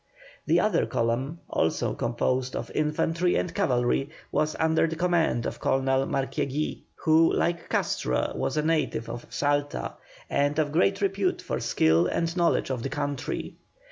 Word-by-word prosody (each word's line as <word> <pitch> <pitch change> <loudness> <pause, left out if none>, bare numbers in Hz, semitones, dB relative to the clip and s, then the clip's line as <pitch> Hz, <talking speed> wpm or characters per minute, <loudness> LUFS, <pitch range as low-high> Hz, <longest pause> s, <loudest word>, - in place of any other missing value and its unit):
The 170 - +4
other 180 -2 +2
column, 125 +8 -1
also 80 - 0
composed 125 +2 -1
of - - -4
infantry 165 +3 +1
and 175 - -1
cavalry, 135 -6 +1 0.2
was 155 0 0
under 160 0 +2
the 165 - -3
command 170 -8 +1
of - - -4
Colonel 135 0 +1
Marquiegui, 140 +2 -2
who 160 +1 +4
like 170 0 -1
Castro 65 0 0
was - - -2
a 150 - +2
native 155 -7 0
of 120 +1 -7
Salta, 145 0 -1 0.3
and 145 +1 +1
of 150 -2 +1
great 190 +5 +2
repute 195 -1 0
for - - -2
skill 80 +2 +3
and 165 - -1
knowledge 170 -5 +2
of 125 -3 -2
the 135 - -3
country. 145 -2 -3
150 Hz, 150 wpm, -27 LUFS, 130-165 Hz, 0.3 s, The